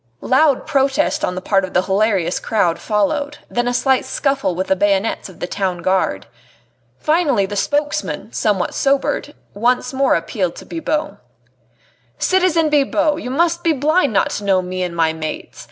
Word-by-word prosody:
Loud 275 +1 +3
protest 290 +1 +1
on 180 - -1
the 185 - -5
part 195 0 +2
of 185 - -6
the 180 - +3
hilarious 195 -2 +1
crowd 180 -7 0
followed, 285 +8 -1
then 240 0 0
a - - +1
slight 265 0 +2
scuffle 275 - -1
with 185 +2 -1
the 190 - +2
bayonets 200 +2 0
of 185 - -15
the - - -2
Town 180 -2 -3
Guard. 185 +1 0 0.7
Finally 300 - +2
the 205 +2 -6
spokesman, 290 +7 -2
somewhat 200 -4 0
sobered, 280 +2 0 0.2
once 245 +4 0
more 270 0 +2
appealed 175 +1 -2
to - - -10
Bibot. 310 -9 -3 1.0
"Citizen 350 -4 +2
Bibot! 295 +1 +2
you 250 - -5
must 340 +5 +1
be 330 -2 +3
blind 300 +1 +2
not 205 - +1
to 205 - -4
know 190 -2 +2
me 185 +1 -4
and 175 -1 -3
my 160 -1 +2
mates! 155 -1 -6
240 Hz, 170 wpm, -19 LUFS, 190-295 Hz, 1.0 s, Loud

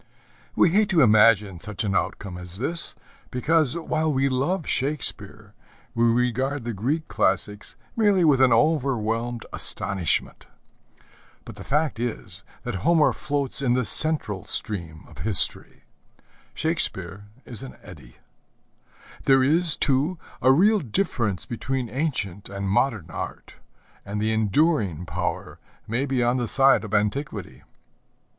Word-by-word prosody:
We 170 - +4
hate 205 +4 +2
to 170 -7 +4
imagine 105 -4 +4
such 105 +3 -4
an 100 -2 -1
outcome 95 -2 -3
as 90 0 -7
this, 155 +7 +1 0.3
because, 155 +3 +1
while 160 -1 -1
we 135 0 +1
love 145 +7 -1
Shakespeare, 110 -7 -4 0.4
we 115 -1 +1
regard 125 +3 0
the 120 0 -4
Greek 140 +11 -2
classics 105 +2 -1 0.2
merely 205 -5 +3
with 140 -4 +4
an 130 -2 +5
overwhelmed 120 -4 0
astonishment. 95 -4 +2 1.0
But - - -11
the - - -7
fact 150 -5 -1
is 100 -5 -4 0.2
that 120 -5 -4
Homer 165 - +3
floats 140 -2 -2
in 125 -3 +1
the 125 -1 0
central 110 - +3
stream 85 -7 -5
of - - -16
History, 95 -8 +2 0.7
Shakespeare 100 - 0 0.2
in - - -11
an 135 - -10
eddy. 75 -11 -14 1.1
There 135 -1 +4
is, 160 +4 +3
too, 145 +6 0 0.2
a 130 - +5
real 205 +9 +4
difference 115 - -2
between 125 +1 -4
ancient 120 - -3
and 100 0 -5
modern 105 - 0
art, - - -7 0.5
and 100 +1 -5
the 110 +1 0
enduring 110 - +1
power - - -4 0.3
may 120 +6 -1
be 130 -2 0
on 120 +2 +1
the 120 -2 -2
side 135 +2 +4
of 105 - -8
antiquity. 105 - -3
120 Hz, 135 wpm, -24 LUFS, 105-145 Hz, 1.1 s, an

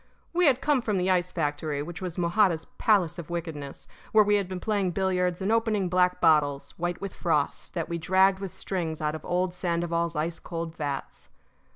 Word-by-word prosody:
We 355 -1 +4
had 260 -2 +4
come 290 -3 +2
from 210 -4 -1
the 185 +1 +2
ice 180 -1 +1
factory, 145 -2 -2
which 170 +2 -8
was 180 -2 -5
Mojada's 170 -2 +2
palace 185 -7 +3
of 170 - -8
wickedness, 160 -5 -5 0.3
where 215 -1 +7
we 205 0 +3
had 200 -2 -1
been 185 0 -5
playing 200 -3 0
billiards 180 -1 0
and 200 - +1
opening 220 -4 +1
black 180 0 +2
bottles, 150 -4 +3
white 175 0 -3
with 200 -1 -5
frost, 155 -1 -1
that 165 -2 -2
we 170 0 -3
dragged 190 +3 +3
with 195 -2 -5
strings 165 -4 -3
out 150 -1 -1
of 155 - -7
old 180 0 0
Sandoval's 170 -1 -1
ice 165 +3 -2
cold 165 -1 -5
vats. 145 -3 -5
175 Hz, 195 wpm, -27 LUFS, 165-190 Hz, 0.3 s, where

